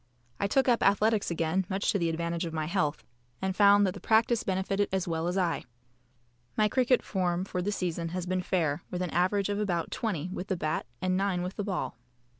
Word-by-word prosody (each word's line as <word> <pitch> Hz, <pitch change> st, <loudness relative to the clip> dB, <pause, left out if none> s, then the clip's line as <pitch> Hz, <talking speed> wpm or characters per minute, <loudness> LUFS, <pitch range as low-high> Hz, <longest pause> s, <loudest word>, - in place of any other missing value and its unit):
I 200 Hz, -, +1 dB
took 265 Hz, +6 st, +2 dB
up 240 Hz, -2 st, +3 dB
athletics 210 Hz, +1 st, +3 dB
again 170 Hz, +2 st, 0 dB
much 195 Hz, +1 st, +1 dB
to 200 Hz, -, 0 dB
the 170 Hz, -1 st, +1 dB
advantage 170 Hz, +1 st, -2 dB
of 165 Hz, -, -7 dB
my 155 Hz, -1 st, -1 dB
health, 155 Hz, -3 st, -1 dB, 0.4 s
and 190 Hz, 0 st, -2 dB
found 205 Hz, 0 st, +6 dB
that 185 Hz, -, 0 dB
the -, -, -9 dB
practice 225 Hz, +1 st, +3 dB
benefited 195 Hz, +1 st, 0 dB
as 190 Hz, -2 st, -1 dB
well 165 Hz, 0 st, -1 dB
as 180 Hz, +2 st, -1 dB
I. 175 Hz, -3 st, 0 dB, 0.9 s
My 215 Hz, -, +4 dB
cricket 250 Hz, +2 st, +2 dB
form 180 Hz, -2 st, -1 dB
for 185 Hz, -2 st, -3 dB
the 200 Hz, +3 st, -1 dB
season 170 Hz, -4 st, -2 dB
has 180 Hz, +1 st, -3 dB
been 185 Hz, 0 st, 0 dB
fair, 170 Hz, -4 st, 0 dB
with 180 Hz, 0 st, -2 dB
an 175 Hz, -, -3 dB
average 185 Hz, +4 st, +1 dB
of 205 Hz, 0 st, -1 dB
about 175 Hz, -5 st, -1 dB
20 185 Hz, -6 st, -2 dB
with 185 Hz, -, -5 dB
the 190 Hz, -, -1 dB
bat 155 Hz, -4 st, -2 dB, 0.2 s
and 185 Hz, 0 st, +2 dB
9 190 Hz, -2 st, 0 dB
with 185 Hz, +2 st, -4 dB
the 205 Hz, -, -2 dB
ball. 185 Hz, -10 st, -3 dB
185 Hz, 220 wpm, -29 LUFS, 170-200 Hz, 0.9 s, found